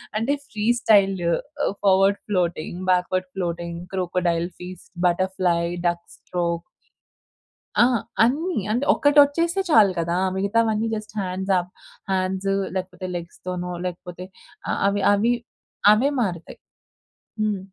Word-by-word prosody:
అంటే 225 +6 +1
free 210 0 -4
style, 200 -4 +4 0.7
forward 195 0 +4
floating, 175 -3 -1
backward 185 +1 +1
floating, 170 -2 -3
crocodile 175 -2 0
feast, 180 0 -10 0.2
butterfly, 180 -1 +1 0.3
duck 170 0 -2
stroke. 170 -1 -2 1.2
ఆ! - - +7 0.4
అన్నీ. 310 +10 +1
అంటే 245 +6 0
ఒకటోచ్చేస్తే 295 +5 +4
చాలు 215 -9 +6
కదా! 170 +1 -1 0.2
మిగతావన్నీ 220 +2 +1
జస్ట్ 215 0 -7
హ్యాండ్స్ 190 0 -2
అప్, 180 +1 -7 0.4
హ్యాండ్స్ 190 +1 -1 0.3
లేకపోతే 185 0 -4
లెగ్స్‌ 170 -1 -7
తోనో 180 0 -3
లేకపోతే 180 0 -6 0.5
ఆహ్, - - -1
అవి 200 0 0
అవి 220 +4 +2 0.6
అవే 245 +7 +2
మారుతాయి. 175 -6 -4 0.8
హ్మ్. 210 -2 0
190 Hz, 110 wpm, -23 LUFS, 180-215 Hz, 1.2 s, ఆ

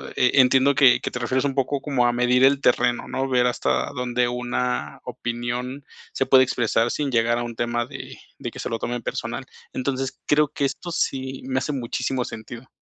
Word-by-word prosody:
e 125 - +3
entiendo 130 +2 +4
que 130 -3 +6
que - - -2
te - - -4
refieres 130 +3 0
un 135 -1 -1
poco 135 +1 0
como 135 -5 +1
a 120 - +4
medir 125 +1 +3
el 135 0 +5
terreno, 120 0 +2
¿no?, 135 +1 -2
ver 125 -1 +3
hasta 120 - 0
dónde 125 -1 0
una 125 -9 -2
opinión 120 +3 -4 0.3
se 135 - 0
puede 130 -1 +6
expresar 120 -2 +1
sin 145 -3 -2
llegar 115 0 +2
a 120 - -2
un 120 -1 -6
tema 120 0 -1
de 135 +2 -9 0.2
de - - -5
que - - -11
se - - -3
lo 115 - -1
tomen 120 +1 -3
personal. - - -4 0.3
Entonces, 135 0 -3
creo 150 -1 +3
que 140 - -1
esto 175 +5 -4
sí 135 -4 -2
me 130 0 0
hace 150 - -3
muchísimo 125 0 -2
sentido. 115 +3 -9
125 Hz, 200 wpm, -23 LUFS, 120-135 Hz, 0.3 s, que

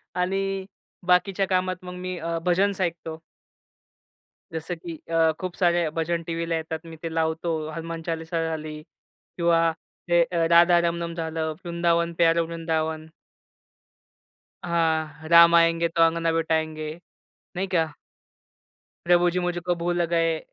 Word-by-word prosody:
आणि 195 +1 -1 0.4
बाकीच्या 190 +2 +2
कामात 185 0 -1
मग 180 0 -7
मी 180 0 -5
अ, 165 0 -2
भजन्स 190 +2 +2
ऐकतो. 165 -2 -3 1.3
जसं 160 +2 -4
की 170 0 -8 0.2
अ, 165 -1 +4
खूप 185 -1 -5
सारे 175 -3 +2
भजन 165 +1 -1
टीव्हीला 165 0 -2
येतात, 160 0 -4
मी 165 -1 -9
ते 165 -1 -4
लावतो. 160 -1 -1
हनुमान 165 +1 -6
चालीसा 165 0 -2
झाली 155 -1 -5
किंवा 165 0 -1 0.4
ते 175 0 +5
अ, 170 -1 0
राधा 170 +1 +6
रमनम 170 0 -3
झालं, 160 -1 -2
वृंदावन 170 0 +1
प्यारा 170 0 +4
वृंदावन. 160 -1 -2 1.6
हां 160 -2 -1
राम 170 0 +8
आएंगे 165 0 +4
तो 165 0 -1
अंगना 165 0 +1
बिठाएंगे 160 -1 -1 0.6
नाही 190 +2 -2
का. 165 -4 0 1.1
प्रभुजी 175 0 +3
मुझे 175 -1 -1
को 175 -1 +1
भूल 175 +1 0
गए, 165 -1 +1
170 Hz, 130 wpm, -25 LUFS, 160-175 Hz, 1.6 s, राम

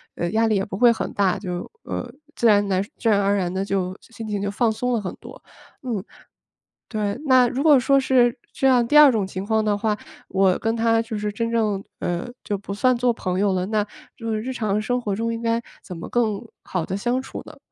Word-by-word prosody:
呃， 170 - -2
压 225 +2 +2
力 220 - +2
也 195 - +1
不 190 - -5
会 240 +2 +6
很 - - -4
大， 195 -3 +2
就， 180 -3 -5
呃， - - -5 0.2
自 - - -2
然 205 -2 +4
来 190 -1 +2
自 225 +3 -3
然 205 -2 +4
而 200 0 +2
然 180 -3 -1
地 190 +1 -1
就 190 -1 -2
心 225 -1 -10
情 205 -1 -2
就 200 0 -1
放 225 +2 +1
松 250 +3 -1
了 230 - 0
很 190 - -5
多。 - - -12 0.4
嗯， 230 -7 -3 0.9
对。 210 +1 -2
那 255 -2 +6
如 260 +3 -2
果 300 -3 +7
说 275 +2 +3
是 250 -2 +3 0.2
这 270 - 0
样， 250 -2 +5
第 300 - +6
二 295 -3 +9
种 215 -4 0
情 190 +1 -6
况 220 0 +1
的 210 -1 +1
话， 215 0 0 0.3
我 190 -1 +2
跟 225 +1 -1
他 225 0 +2
就 225 -1 -5
是 210 0 -2
真 230 +3 -2
正， 210 -4 0 0.2
呃 175 0 -2 0.2
就 205 -2 -2
不 200 0 -6
算 250 +5 +3
作 245 0 +2
朋 185 -5 -3
友 200 0 +2
了， 185 0 -1
那 210 0 0 0.3
就 230 -1 -4
是 215 - -1
日 255 +4 -4
常 215 -4 -1
生 245 +3 0
活 210 -5 -2
中 230 +3 -1
应 230 - -4
该 230 0 0 0.2
怎 180 - -8
么 165 - -7
更 220 -4 0 0.2
好 180 -3 -2
地 190 - -3
相 240 +5 -1
处 - - -7
呢？ - - -12
215 Hz, 255 characters per minute, -23 LUFS, 200-235 Hz, 0.9 s, 二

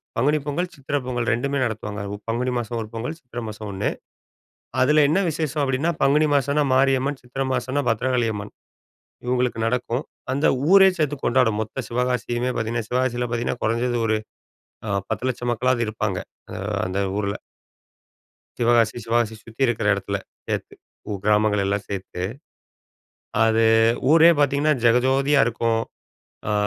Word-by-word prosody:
பங்குனி 145 +6 +2
பொங்கல், 175 +5 -2
சித்திர 140 +1 -5
பொங்கல் 120 -2 -2
ரெண்டுமே 140 +4 -1
நடத்துவாங்க. 105 -2 -4
உ - - -3
பங்குனி 125 +3 0
மாசம் 120 0 -3
ஒரு 110 - -6
பொங்கல், 120 +8 -4
சித்திர 125 -3 -8
மாசம் 105 0 -7
ஒண்ணு. 100 +1 -1 0.9
அதுல 150 +3 +5
என்ன 165 +6 +3
விசேஷம் 155 -2 -2
அப்டின்னா, 135 +5 +1
பங்குனி 150 +3 +4
மாசம்னா 140 +2 +2
மாரியம்மன், 135 +1 +2
சித்திர 130 +2 -3
மாசம்னா 135 +2 -1
பத்ரகாளியம்மன். 115 -3 -1 0.7
இவங்களுக்கு 125 -1 0
நடக்கும். 125 +2 -1 0.3
அந்த 140 +3 +1 0.2
ஊரே 195 0 +8
சேந்து 150 -2 0
கொண்டாடும் 120 -4 +2
மொத்த 115 +4 -5
சிவகாசியுமே 125 0 -1
பாத்தீங்கன்னா, 115 0 -2
சிவகாசியில 125 -1 0
பாத்தீங்கன்னா 120 +1 -2
குறைஞ்சது 120 +2 0
ஒரு 110 -1 +1 0.7
அ - - -2 0.2
10 110 +3 -2
லட்சம் 120 -1 -2
மக்களாது 125 +1 +1
இருப்பாங்க, 110 -3 -2 0.4
அ - - -5 0.3
அந்த 95 +2 -2 0.2
ஊருல. 100 -1 -1 1.3
சிவகாசி 115 -2 +3
சிவகாசி 115 -1 +1
சுத்தி 115 +3 -12
இருக்கற 115 -3 0
இடத்துல 100 0 -2 0.3
சேர்த்து, - - -3 0.4
உ - - -1
கிராமங்கள் 105 -1 +3
எல்லா 100 +1 +1
சேர்த்து, 95 -2 -5 1.2
அது 115 0 +3 0.5
ஊரே 165 +1 +8
பார்த்திங்கன்னா! 145 +2 +3
ஜெகஜோதியா 135 +4 +4
இருக்கும். 115 -1 0 0.7
ஆ - - +1
120 Hz, 135 wpm, -23 LUFS, 110-135 Hz, 1.3 s, ஊரே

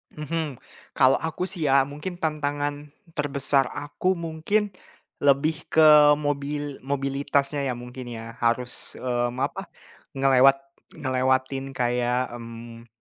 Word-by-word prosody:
Mhm, 155 -1 -3 0.4
kalau 135 0 +4
aku 160 +2 -3
sih 180 -5 -1
ya, 135 0 +5
mungkin 150 +6 -6
tantangan 145 -2 -2 0.2
terbesar 140 -3 +1
aku 145 +6 -1
mungkin, 170 +6 -1 0.5
lebih 145 +3 +2
ke 160 - +5 0.3
mobil 145 -1 -3
mobilitasnya 140 +1 -1
ya 125 - -1
mungkin 125 +1 -9
ya, 115 -1 -8
harus, 120 +1 +1
mmm, 120 -1 -2
apa, 190 +7 -4 0.5
ngelewat 135 0 +5 0.4
ngelewatin 130 0 -1
kayak, 125 0 0
mmm, 115 0 -10
140 Hz, 110 wpm, -25 LUFS, 130-150 Hz, 0.5 s, ya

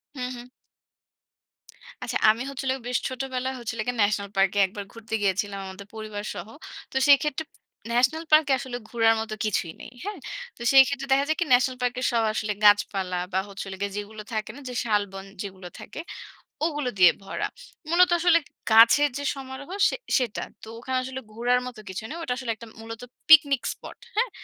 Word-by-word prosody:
হু, 255 - -6
হু। 240 - -8 1.6
আচ্ছা, - - -1
আমি 220 +2 +2
হচ্ছে 275 -1 -6 0.2
বেশ 250 - +1
ছোটবেলায় 260 0 -3
হচ্ছে 235 -2 -4 0.3
ন্যাশনাল 205 -1 +1
পার্কে 195 +1 +3
১ 190 - -8
বার 205 -1 -5
ঘুরতে 225 -1 -10
গিয়েছিলাম 200 0 0
আমাদের 195 +1 -10
পরিবারসহ। 210 -3 -6 0.4
তো - - -15
সেক্ষেত্রে, 290 +2 +4 0.5
ন্যাশনাল 255 +7 +2
পার্কে 305 -2 +6
আসলে 255 -3 -5
ঘুরার 225 -1 +3
মতো 215 -1 -4
কিছুই 175 -6 -1
নেই। - - -10
হ্যাঁ? 410 -3 -5 0.4
তো - - -14
সেই 270 -1 +9
ক্ষেত্রে 275 -1 -3
দেখা 275 +1 +4
যায় 315 - 0
কি, 345 - +1
ন্যাশনাল 255 +1 +3
পার্ক 245 0 0 0.2
সব 230 -1 +2
আসলে 210 -1 -1
গাছপালা 195 -3 +3
বা 190 - +3
হচ্ছে 195 0 -7 0.3
যেগুলো 210 +1 -6
থাকে 215 -1 -2
না, 285 - -10 0.3
শালবন 205 -3 -1 0.2
যেগুলো 190 -3 -7
থাকে - - -8 0.6
ওগুলো 295 -5 -1
দিয়ে 180 -2 +9
ভরা। 195 - -3 0.4
মূলত 355 +2 +5
আসলে 345 0 +5 0.3
গাছের 230 +6 +7
যে 285 - -4
সমারোহ 270 +3 -8 0.2
সে - - -3 0.2
সেটা। 250 -6 -1 0.2
তো - - -9
ওখানে 260 +2 -2
আসলে 260 0 -5
ঘোরার 245 +2 +2
মতো 245 -3 -9
কিছু 190 +3 -5
নেই। 320 - -6
ওটা 250 - -1
আসলে 255 -3 -3 0.3
মূলত 225 +1 -8 0.3
পিকনিক 285 -5 +7
স্পট। - - -12 0.2
হ্যাঁ? 475 +3 +2
240 Hz, 165 wpm, -26 LUFS, 205-275 Hz, 1.6 s, সেই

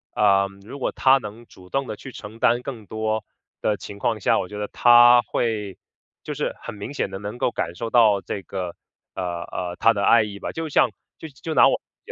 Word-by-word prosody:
嗯， 100 -1 +2
如 140 - -8
果 135 - -2
他 135 0 +4
能 110 0 -9
主 90 -4 -17
动 135 +3 -1
地 - - -4
去 135 - -10
承 110 -1 -10
担 120 +1 +3
更 125 -5 -7
多 110 +1 -2 0.4
的 105 -1 +1
情 100 - -9
况 110 +2 -1
下， - - +2
我 90 - -4
觉 105 - -7
得 105 0 -3
他 120 +1 +7
会 105 -6 -2 0.5
就 - - -5
是 - - -2
很 - - -7
明 105 +7 -7
显 100 - -2
地 95 - -6
能 105 +4 -6
够 - - +1
感 85 -7 -4
受 115 +5 -4
到 110 -4 +5
这 100 - -5
个， 90 -2 -5 0.4
呃， - - -3 0.2
呃， 90 -1 -5
他 115 - +5
的 100 -1 -2
爱 115 - +6
意 100 -1 -6
吧。 - - -5
就 165 0 -4
像 135 -5 +3 0.3
就 160 - -9
就 155 +3 -6
拿 - - +6
我 - - +1 0.2
自 - - -12
110 Hz, 245 characters per minute, -23 LUFS, 100-120 Hz, 0.5 s, 他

